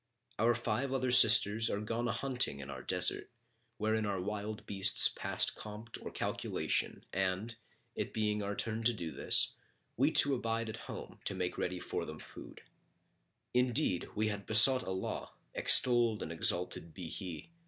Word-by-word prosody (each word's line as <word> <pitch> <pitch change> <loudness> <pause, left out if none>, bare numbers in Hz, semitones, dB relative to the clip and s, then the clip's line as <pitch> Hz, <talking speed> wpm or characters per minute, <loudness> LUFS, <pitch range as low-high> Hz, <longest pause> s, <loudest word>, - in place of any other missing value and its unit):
Our 115 +2 +2
five 120 +3 -3
other 130 -1 -1
sisters 110 -1 +7
are 100 - -2
gone 115 +3 -3
a - - -1
hunting 125 - -1
in 70 0 -8
our 65 - -8
desert, - - -1 0.5
wherein 110 0 -1
are 100 -2 -3
wild 105 +2 -6
beasts 100 -1 +7
past - - -1
compt 110 +2 -10
or - - -7
calculation - - -3
and, 95 +4 -2 0.4
it - - -5
being 105 -1 -2
our 100 0 -4
turn 110 +1 0
to 120 0 +2
do 85 -6 -6
this - - +3 0.4
we - - +3
two 140 - +4
abode 115 -2 -3
at 110 - -7
home, - - -9
to - - -3
make 90 -1 -3
ready 90 0 -4
for - - -5
them 75 - -9
food. - - -13 0.9
Indeed, 125 - -1
we 110 +1 -1
had 100 -1 -7
besought 125 +4 +5
Allah 95 -3 -5 0.2
(extolled 120 -4 +3
and 80 - -7
exalted 85 0 -3
be 90 -4 -7
He!) 90 - -8
105 Hz, 165 wpm, -32 LUFS, 95-115 Hz, 0.9 s, sisters